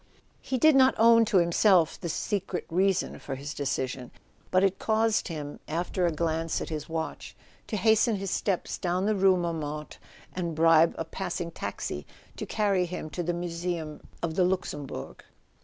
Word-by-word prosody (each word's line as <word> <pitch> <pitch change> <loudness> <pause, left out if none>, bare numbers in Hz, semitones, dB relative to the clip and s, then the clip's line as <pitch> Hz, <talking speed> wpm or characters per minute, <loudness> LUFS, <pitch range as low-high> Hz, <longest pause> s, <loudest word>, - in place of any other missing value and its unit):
He 260 - -2
did 310 +4 +5
not 265 -1 +5
own 230 0 +6
to 210 - +2
himself 170 0 +3
his 170 - -2
secret 190 0 -2
reason 190 +2 +1
for 135 - -5
this 140 +3 -6
decision; 130 -2 -3 0.4
but 185 +1 +3
it 195 -1 +1
caused 220 0 +1
him, 150 -4 -6
after 175 +3 -1
a - - +1
glance 165 +1 -1
at - - -5
his 155 -1 -5
watch, 160 0 -5 0.3
to 215 - -2
hasten 220 +2 +3
his 195 -2 -4
steps 190 -4 -1
down 180 +1 0
the 215 - +2
rue 190 -2 +4
Montmartre 155 -3 -4 0.3
and 170 -3 -3
bribe 165 0 +5
a 165 - -3
passing 175 0 -4
taxi 75 - -5 0.3
to - - -5
carry 200 -4 +1
him 170 -3 -6
to 175 - -3
the 175 0 -1
Museum 170 -2 -4 0.2
of 165 -1 -1
the 185 - +2
Luxembourg. 145 - -3
175 Hz, 170 wpm, -28 LUFS, 160-195 Hz, 0.4 s, own